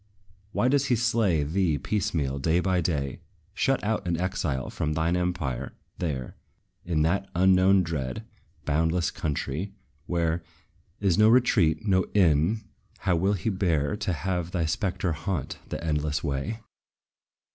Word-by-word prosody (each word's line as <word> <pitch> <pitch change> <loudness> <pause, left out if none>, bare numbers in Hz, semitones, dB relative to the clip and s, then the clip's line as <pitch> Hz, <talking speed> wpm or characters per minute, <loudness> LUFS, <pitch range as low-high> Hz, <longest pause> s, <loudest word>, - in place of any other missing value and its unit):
Why 120 - +1
does 140 +1 +2
he 125 - +3
slay 110 -9 +2
thee 80 0 +1
piecemeal, 70 -6 -1
day 80 +5 +2
by 90 0 +1
day? 70 -5 -2 0.3
Shut - - +1
out 105 -3 -1
in 85 -1 0
exile 85 -8 -2
from 75 - -1
thine 80 +2 +1
empire, 90 -8 -2 0.3
there, 70 -7 -3 0.5
In 80 -3 +1
that 95 +4 0
unknown, 95 +1 +5
dread, 70 -7 -4 0.4
boundless 80 +4 +1
country, 80 +5 -3 0.3
where 85 -1 0 0.6
Is 100 -1 +2
no 105 +1 +7
retreat, 105 -10 +3
no 95 -3 +3
inn, 90 +3 +3 0.4
how 95 - +2
will 95 +5 +2
he 105 +3 -1
bear 90 -3 +1
To 95 - -2
have 90 0 -2
thy 90 -3 -1
spectre 90 +2 -1
haunt 80 -1 -3
the - - -4
endless 75 -2 -1
way? 75 +10 -2
85 Hz, 140 wpm, -27 LUFS, 75-95 Hz, 0.6 s, no